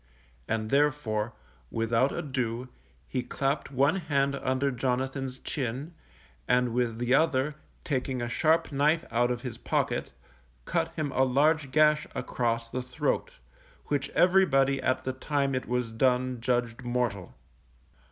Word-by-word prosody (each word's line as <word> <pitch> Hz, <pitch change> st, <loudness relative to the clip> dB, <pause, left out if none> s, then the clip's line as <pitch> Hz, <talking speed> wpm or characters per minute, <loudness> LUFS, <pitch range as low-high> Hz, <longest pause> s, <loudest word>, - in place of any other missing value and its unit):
And 110 Hz, -1 st, -2 dB
therefore, 130 Hz, -7 st, +1 dB, 0.4 s
without 115 Hz, +4 st, +1 dB
ado, 125 Hz, -3 st, -3 dB, 0.4 s
he 130 Hz, -, -1 dB
clapped 140 Hz, +3 st, -2 dB
one 140 Hz, +6 st, +2 dB
hand 140 Hz, -5 st, +1 dB
under 135 Hz, 0 st, 0 dB
Jonathan's 130 Hz, +1 st, -2 dB
chin, 135 Hz, +5 st, -4 dB, 0.5 s
and 125 Hz, -1 st, +2 dB
with 120 Hz, -2 st, 0 dB
the 120 Hz, +2 st, +1 dB
other, 150 Hz, -1 st, +3 dB, 0.3 s
taking 130 Hz, -2 st, -1 dB
a 120 Hz, -, -2 dB
sharp 160 Hz, +7 st, +2 dB
knife 150 Hz, +4 st, +2 dB
out 120 Hz, +1 st, +2 dB
of 120 Hz, -1 st, -3 dB
his 125 Hz, -3 st, -6 dB
pocket, -, -, -1 dB, 0.6 s
cut -, -, 0 dB
him 155 Hz, -4 st, -2 dB
a 130 Hz, -, +1 dB
large 145 Hz, +3 st, +2 dB
gash 150 Hz, +2 st, +4 dB
across 115 Hz, -1 st, -1 dB
the 130 Hz, +2 st, -3 dB
throat, 125 Hz, 0 st, -2 dB, 0.6 s
which 140 Hz, -2 st, 0 dB
everybody 140 Hz, -8 st, +4 dB
at 130 Hz, -, 0 dB
the 130 Hz, -, -2 dB
time 140 Hz, +1 st, -1 dB
it 130 Hz, -, -2 dB
was 125 Hz, -1 st, -1 dB
done 125 Hz, +1 st, +1 dB
judged 120 Hz, -1 st, 0 dB
mortal. 120 Hz, -6 st, -2 dB
130 Hz, 135 wpm, -28 LUFS, 120-140 Hz, 0.6 s, gash